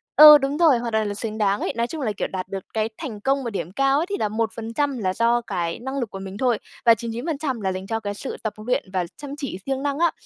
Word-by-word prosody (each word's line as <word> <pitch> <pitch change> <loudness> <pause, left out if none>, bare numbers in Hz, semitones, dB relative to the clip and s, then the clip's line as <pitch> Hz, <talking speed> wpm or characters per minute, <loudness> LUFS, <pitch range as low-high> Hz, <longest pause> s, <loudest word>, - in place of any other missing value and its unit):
ừ, 300 0 +11
đúng 280 +1 -2
rồi, 315 -7 +5
hoàn 235 -1 -3
toàn 220 -1 +1
là 205 - -2
xứng 215 +1 -4
đáng 205 -1 +2
ấy. - - -2
Nói 235 +1 0
chung 315 +1 -5
là, 220 - 0
kiểu, - - -1
đạt 185 -1 -5
được 195 -1 -5
cái 220 0 0
thành 230 -10 -6
công 270 +3 +1
mà 235 - -2
điểm 180 -5 -4
cao 275 +5 +2
ấy 320 - +1
thì 400 - -1
là 210 - 0
1% 230 +5 -1
là 185 -4 -1
do 235 +3 +2
cái 175 -7 -3
năng 265 +3 -4
lực 235 -5 -2
của 195 - -7
mình 195 +1 -7
thôi, 245 -3 +2 0.3
và 230 - +8
99% 250 +3 -3
là 190 -1 0
dành 185 +1 -5
cho 225 -1 -1
cái 205 -2 -4
sự 260 - -6
tập 220 - -2
luyện 255 +2 +1
và 180 -2 0
chăm 285 -1 -7
chỉ 275 -10 -4
siêng 270 0 -2
năng 285 0 -1
á. 340 -1 +4
230 Hz, 280 wpm, -23 LUFS, 205-275 Hz, 0.3 s, ừ